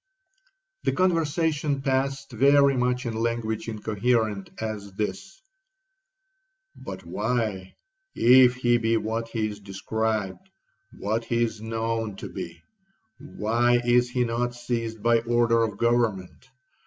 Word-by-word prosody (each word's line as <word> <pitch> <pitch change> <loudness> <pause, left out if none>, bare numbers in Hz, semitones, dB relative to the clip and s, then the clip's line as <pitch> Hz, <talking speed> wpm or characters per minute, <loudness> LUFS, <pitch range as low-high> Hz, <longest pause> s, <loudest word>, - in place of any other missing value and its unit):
'The - - 0
conversation 160 -5 +1
passed 135 0 -1
very 140 +3 +4
much 125 0 0
in 115 - -2
language 110 -1 -2
incoherent 110 -1 -1
as 105 -3 -5 1.8
this:—'But 95 -2 -9
why, 105 0 -2 0.4
if 125 +1 +6
he 120 -1 +2
be 115 0 +2
what 110 +1 -2
he 115 -2 -2
is 105 -1 -7
described, 110 - -3 0.5
what 110 +3 -2
he 120 0 +1
is 110 -2 -3
known 115 -1 -2
to - - -8
be,—why 120 - -3
is 120 0 +3
he 125 0 0
not 120 +1 -1
seized 115 -3 -4
by 115 0 +4
order 115 0 +2
of 110 -3 -1
government? 115 -1 0
115 Hz, 115 wpm, -25 LUFS, 110-125 Hz, 1.8 s, if